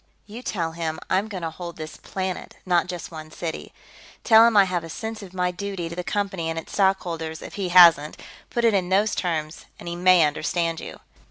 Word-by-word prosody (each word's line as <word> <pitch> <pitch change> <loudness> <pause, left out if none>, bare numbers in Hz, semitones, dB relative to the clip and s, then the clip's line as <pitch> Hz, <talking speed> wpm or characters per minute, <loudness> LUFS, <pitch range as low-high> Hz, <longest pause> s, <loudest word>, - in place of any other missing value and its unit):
"You 220 +4 -9
tell 170 -9 -2
him 160 -1 -4
I'm 195 +3 +2
going 190 -5 -6
to 165 - -2
hold 170 +1 -8
this 155 -1 -7
planet, 190 -1 -5
not 180 -1 +2
just 180 -1 -6
one 155 -1 -9
city. 160 0 -6 0.5
Tell 225 -1 +7
him 230 -3 +2
I 200 - +8
have 180 -3 -2
a 165 - -8
sense 220 +6 -6
of 195 -3 -10
my 180 -1 -1
duty 185 -2 -5
to 170 - -7
the 180 - -4
Company 195 -4 -2
and 165 - -3
its 165 - -7
stockholders, 170 -5 0
if - - -9
he 195 -3 -3
hasn't; 170 -4 +7 0.3
put 235 -1 0
it 230 - +4
in 185 -3 0
those 205 +3 +2
terms 160 -3 -3
and - - -11
he 170 - -3
may 180 -1 +5
understand 165 +2 -1
you." - - -9
180 Hz, 220 wpm, -24 LUFS, 165-195 Hz, 0.5 s, I